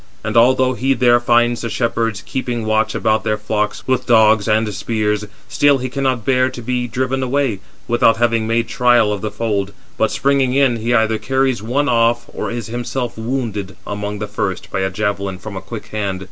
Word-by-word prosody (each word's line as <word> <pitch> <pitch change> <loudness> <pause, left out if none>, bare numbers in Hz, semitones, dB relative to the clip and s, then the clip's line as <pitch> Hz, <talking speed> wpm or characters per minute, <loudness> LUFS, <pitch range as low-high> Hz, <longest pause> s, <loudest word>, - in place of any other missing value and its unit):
And 110 +1 -3
although 130 +2 +4
he 135 +2 0
there 120 -1 +4
find 120 0 +3
the 115 0 -5
shepherds 115 -2 -1
keeping 120 -3 -3
watch 110 0 +1
about 110 -1 +1
their 105 0 0
flocks 105 0 -2
with 130 -1 0
dogs 110 -3 +4
and 110 -1 +1
spears, 105 -1 -1 0.2
still 145 -1 +3
he 130 0 -4
cannot 130 -3 -1
bear 130 -1 +3
to 130 -1 -8
be 125 +1 -1
driven 130 +2 -1
away, 130 -5 0 0.3
without 115 -1 +3
having 115 -1 +1
made 115 0 +1
trial 120 -4 +3
of 100 - -5
the 110 - -2
fold, 105 -2 -2 0.3
but, 110 - +3
springing 135 -2 +1
in, 135 -4 +3
he 115 +2 -2
either 110 -2 +2
carries 130 -2 0
[one] 130 +7 0
off, 120 -1 +2
or - - -3
is 115 -1 -4
himself 120 +2 -4
wounded 110 -5 -3
among 105 0 -4
the 105 - -3
first 100 -2 -4
by - - -1
a 95 0 0
javelin 100 -1 -2
from 100 +2 -8
a 95 - -5
quick 115 -2 -8
hand. 100 -3 -3
115 Hz, 195 wpm, -18 LUFS, 105-125 Hz, 0.3 s, although